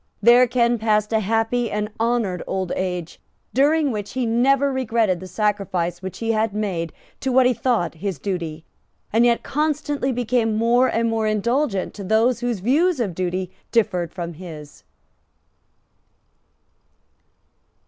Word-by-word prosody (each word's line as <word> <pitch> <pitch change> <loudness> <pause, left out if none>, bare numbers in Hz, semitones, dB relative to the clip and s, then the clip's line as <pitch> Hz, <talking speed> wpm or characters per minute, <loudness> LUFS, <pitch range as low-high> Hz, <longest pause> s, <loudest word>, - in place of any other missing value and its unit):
There 240 +4 +6
Ken 240 -1 +2
passed 215 0 +1
a 220 - +3
happy 225 +3 0
and 210 +1 -3
honoured 225 -6 0
old 190 -2 -2
age, 180 -3 -4 0.3
during 290 +2 +3
which 210 -2 -5
he 255 -1 -1
never 270 +4 +2
regretted 225 -7 +1
the 185 - -8
sacrifice 185 -3 -1
which 190 -1 -6
he 225 0 -1
had 220 -1 0
made 180 -6 -2 0.3
to 265 - -1
what 255 0 +5
he 250 - +4
thought 235 -8 0
his 190 +2 -4
duty, 165 -5 -4 0.5
and 230 +2 +4
yet 235 -1 +2
constantly 295 -2 -1
became 235 -2 0
more 235 +3 +3
and 230 -1 0
more 225 -1 0
indulgent 215 0 0
to 205 - -8
those 225 +5 +2
whose 240 -5 -2
views 305 - +2
of 205 -7 -1
duty 185 +1 -2 0.2
differed 180 -7 +1
from 170 -2 -5
his. 155 -3 -11
220 Hz, 145 wpm, -22 LUFS, 185-245 Hz, 0.5 s, There